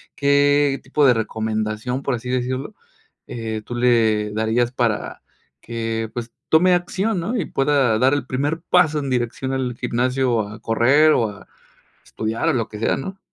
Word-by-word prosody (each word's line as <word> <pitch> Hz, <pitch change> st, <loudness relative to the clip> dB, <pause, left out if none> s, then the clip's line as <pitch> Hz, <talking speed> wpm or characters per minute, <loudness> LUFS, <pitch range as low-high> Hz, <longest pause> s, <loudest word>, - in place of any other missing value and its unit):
¿qué 145 Hz, -1 st, +3 dB
tipo 140 Hz, +2 st, +1 dB
de 130 Hz, -, +6 dB
recomendación, 110 Hz, +2 st, -2 dB
por 140 Hz, -2 st, -1 dB
así 120 Hz, +1 st, -8 dB
decirlo, 130 Hz, +7 st, -2 dB, 0.5 s
eh, 110 Hz, -2 st, -5 dB
tú 120 Hz, -, -6 dB
le 110 Hz, -4 st, +2 dB
darías 110 Hz, +3 st, 0 dB
para 120 Hz, -4 st, -2 dB, 0.4 s
que, 115 Hz, -1 st, -3 dB
pues, 120 Hz, -1 st, -6 dB, 0.2 s
tome 180 Hz, +3 st, +5 dB
acción?, 190 Hz, +3 st, 0 dB
¿no? 215 Hz, +9 st, -2 dB
Y 185 Hz, -, -1 dB
pueda 135 Hz, -5 st, +1 dB
dar 130 Hz, +2 st, +4 dB
el 145 Hz, -3 st, -2 dB
primer 145 Hz, +5 st, -2 dB
paso 165 Hz, -3 st, +3 dB
en 140 Hz, -2 st, -4 dB
dirección 125 Hz, +2 st, -2 dB
al 130 Hz, -2 st, -2 dB
gimnasio 125 Hz, 0 st, 0 dB
a 110 Hz, +2 st, -10 dB
correr, 135 Hz, +7 st, +4 dB
o 115 Hz, -2 st, +1 dB
a 100 Hz, -1 st, -13 dB, 0.6 s
estudiar, 110 Hz, +1 st, -3 dB
o -, -, +3 dB
lo 115 Hz, -3 st, -1 dB
que 105 Hz, -, -8 dB
sea, 110 Hz, -, +1 dB
¿no? 190 Hz, +8 st, -6 dB
125 Hz, 165 wpm, -21 LUFS, 115-145 Hz, 0.6 s, de